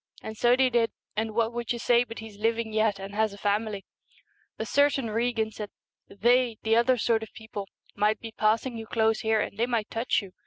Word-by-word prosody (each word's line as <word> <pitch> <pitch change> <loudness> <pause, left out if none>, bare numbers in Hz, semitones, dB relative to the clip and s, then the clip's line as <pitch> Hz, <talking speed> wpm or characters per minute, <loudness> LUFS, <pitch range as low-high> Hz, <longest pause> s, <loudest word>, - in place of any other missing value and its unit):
And 220 - -6
so 240 +3 +4
they 260 0 +3
did, 230 -1 +3 0.3
and 220 0 -2
what 230 0 +1
would 240 -1 -3
you 240 - -1
say 240 0 +3
but 230 -2 -9
he's 220 -2 -10
living 225 0 0
yet 215 -2 +2
and 195 +1 -8
has 215 0 +1
a - - -10
family! 205 0 -1 0.7
A - - -3
certain 285 -5 +2
Regan 225 -1 0
said, 210 -1 -6 0.3
" - - -61 0.2
They, 240 -1 +4
the 225 0 +3
other 245 +2 +4
sort 225 0 +2
of 220 - -8
people, 210 -3 -7 0.3
might 210 +1 +1
be 225 - -8
passing 225 +3 0
you 225 - -8
close 220 -1 +2
here 220 -1 +2
and 205 - -5
they 235 - +2
might 230 -4 -1
touch 225 -1 0
you. 195 - -11
225 Hz, 225 wpm, -27 LUFS, 215-235 Hz, 0.7 s, so